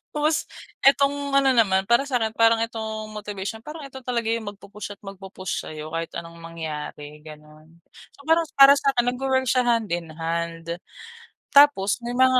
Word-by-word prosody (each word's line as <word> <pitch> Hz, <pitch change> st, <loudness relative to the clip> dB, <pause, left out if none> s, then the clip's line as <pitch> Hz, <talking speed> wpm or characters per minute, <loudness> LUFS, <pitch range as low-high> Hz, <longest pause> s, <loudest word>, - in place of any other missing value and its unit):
Tapos 305 Hz, +1 st, +1 dB, 0.4 s
itong 280 Hz, 0 st, +3 dB
ano 275 Hz, -1 st, +5 dB
naman, 195 Hz, -6 st, +3 dB
para 235 Hz, +7 st, +2 dB
sa 265 Hz, -, -2 dB
akin, 220 Hz, -1 st, 0 dB
parang 230 Hz, 0 st, +4 dB
itong 220 Hz, -1 st, -5 dB
motivation, 210 Hz, 0 st, -6 dB
parang 300 Hz, +6 st, -9 dB
eto 265 Hz, -1 st, -9 dB
talaga 240 Hz, -3 st, -2 dB
'yung 230 Hz, -2 st, -2 dB
magpu-push 205 Hz, +1 st, -9 dB
at -, -, -47 dB
magpu-push 195 Hz, -2 st, -6 dB
sa'yo, 155 Hz, 0 st, -8 dB
kahit 165 Hz, 0 st, -4 dB
anong 170 Hz, 0 st, -8 dB
mangyari, 150 Hz, -2 st, -7 dB
ganun. 155 Hz, +2 st, -15 dB, 0.3 s
So, 280 Hz, -, -17 dB
parang 325 Hz, +2 st, +3 dB
para 275 Hz, 0 st, +9 dB
sa 275 Hz, -, +1 dB
akin 240 Hz, -, +3 dB
nag-wo-work 260 Hz, +1 st, 0 dB
siya 250 Hz, -2 st, +2 dB
hand-in-hand. 170 Hz, -5 st, -2 dB, 0.7 s
Tapos 280 Hz, -7 st, +5 dB
may 240 Hz, -, -3 dB
mga 255 Hz, 0 st, +5 dB
220 Hz, 160 wpm, -24 LUFS, 170-260 Hz, 0.7 s, para